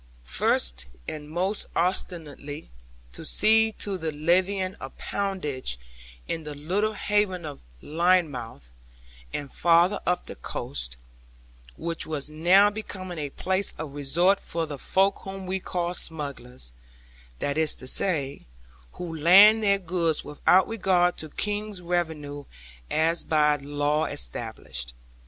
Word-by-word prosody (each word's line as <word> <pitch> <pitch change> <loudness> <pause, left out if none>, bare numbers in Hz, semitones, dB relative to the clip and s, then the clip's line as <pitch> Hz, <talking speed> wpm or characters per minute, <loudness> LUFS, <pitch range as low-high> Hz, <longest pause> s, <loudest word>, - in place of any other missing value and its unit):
First, - - +1 0.2
and 150 -1 -6
most 185 +6 -1
ostensibly, 160 -4 -2 0.4
to - - -7
see 220 +1 +4
to 195 -3 -3
the 160 -1 -2
levying 185 +5 +1
of 135 - -8
poundage 150 - -2 0.5
in 165 -1 -3
the 150 -1 -7
little 190 +9 0
haven 205 -4 0
of 145 -2 -7 0.2
Lynmouth, 150 - 0 0.6
and 140 -2 -5
farther 175 +4 +4
up 180 0 +1
the - - -7
coast, - - -4 0.8
which 165 - -3
was 150 -1 -2
now 185 +6 +5
becoming 185 -5 -6
a 145 -1 -3
place 190 +6 -1
of 155 -3 -6
resort 170 +8 +2
for 165 -1 -3
the 145 -3 -7
folk 195 +7 +2
whom 190 0 -7
we 190 +1 -1
call 175 -1 -2
smugglers, 135 - -4 0.6
that 140 - -1
is 160 -1 +1
to - - -11
say, 140 - -1 0.5
who 170 -2 -6
land 195 +8 +8
their 200 -2 +4
goods 170 -4 -1
without 180 +5 +4
regard 185 -5 +2
to 155 - -7
King's 210 +2 -3
revenue 160 -5 -2 0.4
as 165 +2 +2
by 150 -1 +3
law 145 +2 0
established. 60 - -4
165 Hz, 130 wpm, -26 LUFS, 145-190 Hz, 0.8 s, land